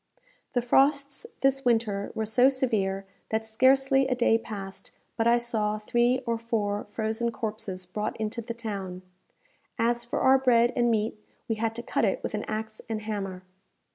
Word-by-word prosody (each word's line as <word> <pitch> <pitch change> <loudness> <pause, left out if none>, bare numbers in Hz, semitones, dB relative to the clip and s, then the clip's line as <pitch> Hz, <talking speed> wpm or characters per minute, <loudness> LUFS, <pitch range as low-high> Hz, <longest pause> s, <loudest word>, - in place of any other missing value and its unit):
The 245 -2 +1
frosts 280 - +2
this 270 0 +2
winter 225 -5 +1
were 220 - -1
so 245 +5 +5
severe, 205 -8 0 0.2
that 220 0 -1
scarcely 270 +4 +4
a 255 - +1
day 235 -2 +3
passed 200 -4 -7 0.3
but 225 - +1
I 235 0 +6
saw 220 -3 -1
three 240 +4 +2
or 230 -1 -1
four 210 -3 -1
frozen 220 +2 -2
corpses 210 -5 -5
brought 210 +4 -3
into 220 +2 -2
the 230 0 -6
town. 195 -5 -5 0.7
As 235 +1 +1
for 235 - -3
our 265 0 +6
bread 240 -2 +4
and 240 -1 +3
meat, 215 -1 -1 0.2
we 225 - +1
had 225 0 -1
to 235 - -5
cut - - -1
it - - +1
with - - -3
an - - -2
axe 215 0 -4
and 215 -1 -3
hammer. 195 -4 -4
225 Hz, 170 wpm, -27 LUFS, 210-240 Hz, 0.7 s, I